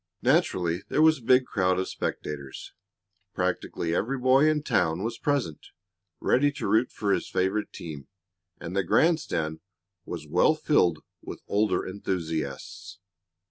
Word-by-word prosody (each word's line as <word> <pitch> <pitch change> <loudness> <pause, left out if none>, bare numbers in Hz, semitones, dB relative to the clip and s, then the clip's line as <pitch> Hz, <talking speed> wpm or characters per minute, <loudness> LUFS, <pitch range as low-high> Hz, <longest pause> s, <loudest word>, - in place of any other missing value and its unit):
Naturally 85 0 +2
there 155 - +3
was 160 -2 +5
a - - -18
big 125 +2 +4
crowd 95 -4 +1
of 95 - -1
spectators. 70 -3 -5 0.6
Practically 85 -1 -2
every 125 +10 0
boy 130 +4 +4
in 150 -1 0
town 85 - +1
was 115 +1 -4
present, 140 - -2 0.5
ready 145 +3 +3
to - - -4
root 110 +5 +2
for 100 -2 0
his - - -2
favorite 95 +3 -1
team, 75 -5 -8 0.5
and 85 +2 -6
the 100 - +3
grand 160 - +3
stand 80 - -3 0.4
was 85 -4 -7
well 90 - +3
filled 145 - +2 0.2
with - - -9
older 100 -3 +1
enthusiasts. 80 -7 -4
95 Hz, 140 wpm, -27 LUFS, 85-130 Hz, 0.6 s, was